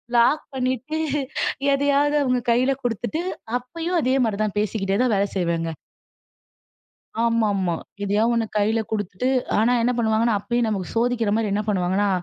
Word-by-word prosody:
Lock 240 +6 +4
பண்ணிட்டு 260 +4 -2 0.8
எதையாவது 285 +1 +2
அவங்க 250 -1 +1
கையில 255 +3 +3
கொடுத்துட்டு 240 - -2 0.4
அப்பயும் 330 +8 -3
அதே 260 0 +1
மாரி 210 -3 -1
தான் 210 -2 -2
பேசிக்கிட்டே 200 -2 -1
தான் 245 - +2
வேலை 200 +1 +1
செய்வேங்க. 165 -2 -1 1.5
ஆமாமா, 205 -6 +1 0.3
எதையாவது 210 +4 +2
ஒண்ணு 230 -1 +1
கையில 220 +2 +2
கொடுத்துட்டு, 205 +2 -2 0.3
ஆனா 230 +3 +3
என்ன 245 - +2
பண்ணுவாங்கன்னா 225 0 +2
அப்பயும் 235 +2 0
நமக்கு 195 -4 -2
சோதிக்கிற 235 -2 +1
மாரி 225 -1 0
என்ன 210 - +1
பண்ணுவாங்கன்னா 195 +1 +1
225 Hz, 135 wpm, -23 LUFS, 205-250 Hz, 1.5 s, Lock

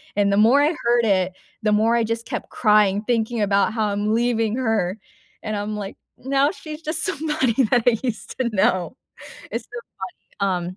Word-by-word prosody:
and 200 -1 +2
the - - +2
more 240 +7 +5
I 305 +4 +3
heard 240 -1 +3
it, 185 -3 +1 0.3
the 215 - +2
more 220 +3 +3
I 235 - +2
just 230 +1 -3
kept - - -5
crying 210 -2 +3
thinking 235 -1 0
about 200 +1 +2
how 220 -2 0
I'm 205 +1 -1
leaving 230 -1 +1
her, 220 -6 0 0.5
and 215 -1 -3
I'm, 205 +1 -3
like, 200 -1 -6 0.2
now 275 +2 +1
she's 310 -4 -9
just 310 +1 -1
somebody 300 - +1
that 240 +1 +2
I 230 -2 +5
used 225 -6 -4
to 250 -2 +1
know. 185 +1 +1 0.6
It's 230 0 -4
so 240 - -8 0.6
funny, 185 -3 0
um, 185 - -9
225 Hz, 190 wpm, -22 LUFS, 205-245 Hz, 0.6 s, more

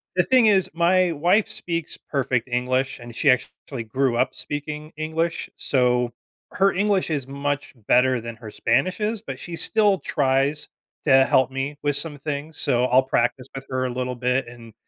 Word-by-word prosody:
the - - +4
thing 255 -3 +4
is 195 -3 +3
my 175 +1 +3
wife 175 +7 +2
speaks 170 -2 -3
perfect 125 -4 -2
English, 130 +2 -1
and 120 0 -10
she 145 - +2
actually 125 0 -1
grew 125 +2 0
up - - +1
speaking 150 +1 -5
English, 160 +2 -2
so, 125 -2 +1 0.4
her 195 +1 +3
English 200 -2 +1
is 140 -4 -2
much 140 +1 -3 0.2
better 125 -1 +4
than 115 0 -7
her 110 -2 -9
Spanish 185 +2 0
is, 215 0 -1
but - - -7
she 175 - -7
still 205 -3 +3
tries 140 +1 0 0.3
to 135 -2 +5
help 130 0 +3
me 135 +2 -3
with 145 -1 +1
some 145 0 -3
things, 145 +2 -5
so 125 0 +1
I'll 130 +1 +4
practice 125 0 0
with 135 0 -7
her 130 -1 -1
a - - -1
little 125 0 -3
bit, 125 +1 0
and 115 -2 -12
140 Hz, 175 wpm, -23 LUFS, 125-165 Hz, 0.4 s, to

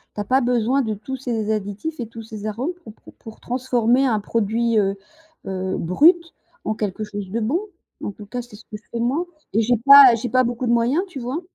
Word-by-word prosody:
Tu 205 - -2
as - - -2
pas 260 +5 +2
besoin 245 +2 +1
de 220 -4 -2
tous 220 +6 -6
ces 230 -4 -2
additifs 210 +9 -4
et 235 - -4
tous 230 0 -10
ces 215 -1 -9
arômes 245 - -3
pour 220 - -11
pour - - -17
pour 220 -1 -13
transformer 250 0 +1
un 220 -4 +1
produit, 230 +1 0
heu, 195 -1 +1 0.5
heu, 190 0 -3
brut 330 - +3 0.3
en 215 - -2
quelque 210 -1 -3
chose 205 -2 -6
de 225 +5 -2
bon. 255 +11 0 0.4
En - - -3
tout 205 +1 -12
cas, 245 +4 -5
c'est 240 -3 -14
ce 210 - -15
que 210 - -8
je 210 - -26
fais 235 - -4
moi 275 +9 0 0.3
et 220 - +2
j'ai 240 +2 +2
pas 280 -3 +10
j'ai 235 +2 -4
pas 255 +2 +3
beaucoup 240 +1 -3
de 235 - +1
moyens, 240 +9 +2
tu 345 -8 -8
vois? 255 +7 -4
230 Hz, 235 wpm, -21 LUFS, 215-255 Hz, 0.5 s, pas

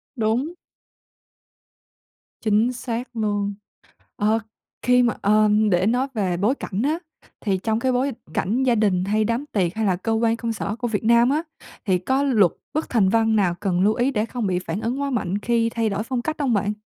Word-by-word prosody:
Đúng. 245 +8 0 1.9
Chính 220 +2 +2
xác 245 0 -4
luôn. 205 -2 -1 0.6
Ờ, 215 +2 +2 0.4
khi 250 0 +4
mà, 235 -2 +2
ờ, 215 +1 +4 0.2
để 180 +1 +2
nói 250 +4 +2
về 190 -5 0
bối 210 +9 +2
cảnh 205 -6 -4
á, 305 +5 +1 0.4
thì 195 -4 0
trong 220 +3 -1
cái 260 0 +1
bối 260 +2 +1 0.2
cảnh 235 +7 0
gia 250 -2 +3
đình 200 -5 +2
hay 215 +2 +1
đám 230 +5 -1
tiệc 185 -4 0
hay 220 0 -1
là 185 -2 +2
cơ 225 +5 -2
quan 225 0 +2
công 230 0 -3
sở 210 0 -4
của 240 0 -2
Việt 220 -1 -2
Nam 235 +2 +5
á 305 +3 +1 0.4
thì 185 -3 +2
có 260 +10 0
luật 220 - +3 0.2
bất 310 - -1
thành 215 -6 +3
văn 225 +1 +2
nào 185 -4 +2
cần 185 -4 0
lưu 205 +3 +3
ý 250 +3 +1
để 215 -5 0
không 240 -2 -3
bị 185 -2 0
phản 180 +2 -4
ứng 240 +5 -2
quá 280 0 -1
mạnh 205 -6 -1
khi 230 +1 +1
thay 225 -1 0
đổi 205 0 -2
phong 245 +1 -3
cách 315 +4 -2
hông 255 -5 +1
bạn? 205 +1 0
225 Hz, 205 wpm, -23 LUFS, 205-245 Hz, 1.9 s, Nam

